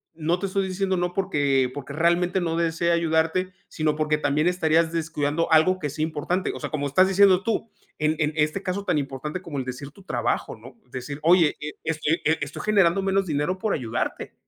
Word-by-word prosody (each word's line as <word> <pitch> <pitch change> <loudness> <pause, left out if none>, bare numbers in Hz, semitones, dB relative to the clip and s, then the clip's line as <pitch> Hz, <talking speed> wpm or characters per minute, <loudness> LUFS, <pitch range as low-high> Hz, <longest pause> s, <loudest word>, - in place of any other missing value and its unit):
no 165 +2 0
te 195 - -2
estoy 195 0 -1
diciendo 190 0 -1
no, 175 0 -1
porque 145 -9 +1
porque 140 0 -7
realmente 175 +3 +2
no 165 -1 -1
desee 170 0 +1
ayudarte, 170 +2 +1 0.2
sino 155 -1 0
porque 150 0 +1
también 150 +2 +1
estarías 165 -2 +2
descuidando 160 -1 -1
algo 160 +4 +5
que 150 - -2
es 145 - -8
importante". 160 +4 -1
O - - -7
sea, - - -4
como 145 -3 -1
estás 185 +7 +4
diciendo 195 -1 +5
tú 225 0 -1 0.3
en 155 +1 +1
en 150 0 +1
este 155 +5 0
caso 195 +1 -2
tan - - +1
importante 140 +5 -5
como 145 -4 -5
el 130 - -4
decir 130 +3 -7
tu 195 - -17
trabajo, 120 -8 -2
¿no?, 125 +4 -14 0.2
decir: 135 +3 -6
"Oye, 170 -1 +5
e 150 0 -5
es 160 -1 -2
e 160 +3 +2
e 160 - 0
estoy 145 0 -5
generando 195 -3 +3
menos 195 0 +1
dinero 155 +5 -1
por 215 +1 0
ayudarte". 120 -4 -3
160 Hz, 205 wpm, -24 LUFS, 150-185 Hz, 0.3 s, algo